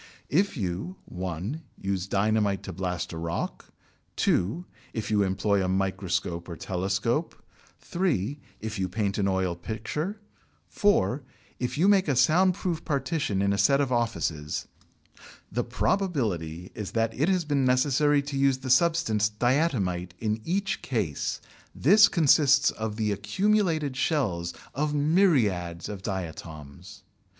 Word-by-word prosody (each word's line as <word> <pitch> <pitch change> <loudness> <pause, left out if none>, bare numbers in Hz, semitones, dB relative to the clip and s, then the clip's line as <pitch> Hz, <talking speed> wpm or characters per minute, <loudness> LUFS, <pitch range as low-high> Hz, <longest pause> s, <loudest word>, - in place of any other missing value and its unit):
If 185 +4 +1
you 95 - -3
(1) 95 - -4 0.2
use 95 -1 -2
dynamite 100 0 +1
to 95 - -6
blast 90 -2 -3
a 80 - -5
rock, 85 +1 -4 0.4
(2) 115 - +1 0.3
if 110 -1 -4
you 105 -1 +3
employ 100 +1 +1
a - - 0
microscope 95 -2 -1
or 85 - -5
telescope, 100 - -1 0.5
(3) 145 - -1 0.2
if 110 -1 -4
you 95 -1 -1
paint 100 +1 -1
an 100 - +2
oil 95 -2 0
picture, 120 - -4 0.5
(4) 145 - +2 0.4
if 125 +3 -2
you 175 +5 +4
make 195 -3 +4
a 140 - +2
sound 180 +7 +4
proof 175 -4 -3
partition 140 - -1
in 100 0 +2
a 100 - -1
set 140 +8 +4
of 140 -2 0
offices, 80 -11 -1 0.8
the 120 +5 0
probability 110 - -1
is 100 -4 -6
that 115 0 +1
it 150 +8 +1
has 185 -3 +1
been 145 -2 +1
necessary 140 +3 +3
to 140 -1 -4
use 135 -1 +3
the 130 -1 -3
substance 130 -8 +3
diatomite 105 - 0
in 110 +1 -2
each 190 - -1
case. 105 - -2 0.4
This 205 - +6
consists 145 -3 +4
of 110 -1 -4
the 110 -1 0
accumulated 155 - +1
shells 105 - 0 0.2
of 150 +1 -1
myriads 130 - +2
of 100 -2 -6
diatoms. 85 -3 -7
110 Hz, 140 wpm, -27 LUFS, 95-150 Hz, 0.8 s, This